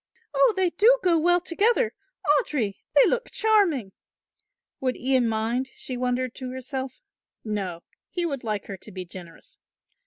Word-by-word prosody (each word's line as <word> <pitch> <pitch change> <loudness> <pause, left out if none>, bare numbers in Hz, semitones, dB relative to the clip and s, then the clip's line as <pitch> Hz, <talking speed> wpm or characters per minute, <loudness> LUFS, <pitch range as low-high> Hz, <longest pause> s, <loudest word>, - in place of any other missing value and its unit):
"Oh, 275 +4 +5
they 370 -2 +2
do 460 +8 +5
go 340 -3 +4
well 350 +2 +4
together! 435 +7 +1 0.5
Audry, 215 -10 -2 0.2
they 285 - +8
look - - 0
charming!" 375 - +2 0.9
Would 255 -1 -1
Ian 255 -1 +2
mind, 230 +4 -1
she 255 - -4
wondered 250 0 -1
to 255 -2 -5
herself; 260 0 -6 0.4
no, 195 -6 -3 0.3
he 350 -1 -2
would 280 -6 -3
like 215 -3 -2
her 195 - -7
to 210 - -13
be 185 -1 -6
generous. 175 -1 -12
260 Hz, 150 wpm, -25 LUFS, 220-345 Hz, 0.9 s, they